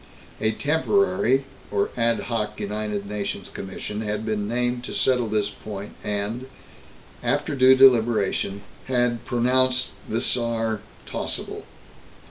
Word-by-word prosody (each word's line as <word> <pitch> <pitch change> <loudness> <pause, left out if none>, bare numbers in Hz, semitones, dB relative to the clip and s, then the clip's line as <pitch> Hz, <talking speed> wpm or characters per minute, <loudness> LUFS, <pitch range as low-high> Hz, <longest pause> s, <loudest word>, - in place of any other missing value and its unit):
A 110 0 +1
temporary 160 - +2 0.3
or 100 -1 0
ad 115 -1 +2
hoc 105 -3 -3
United 105 0 -3
Nations 105 0 -4
commission 105 +2 -5
had 105 0 -2
been 105 -2 -1
named 120 +1 0
to - - -5
settle 125 -3 +2
this 105 -1 0
point 105 -1 -8
and, 105 +5 -2 0.7
after - - 0
due 130 -1 +7
deliberation, 115 -6 +4 0.2
had 120 -2 +1
pronounced 130 +1 +2 0.2
the 110 - 0
Saar 115 -3 0 0.3
tossable. - - -4
115 Hz, 115 wpm, -24 LUFS, 105-125 Hz, 0.7 s, due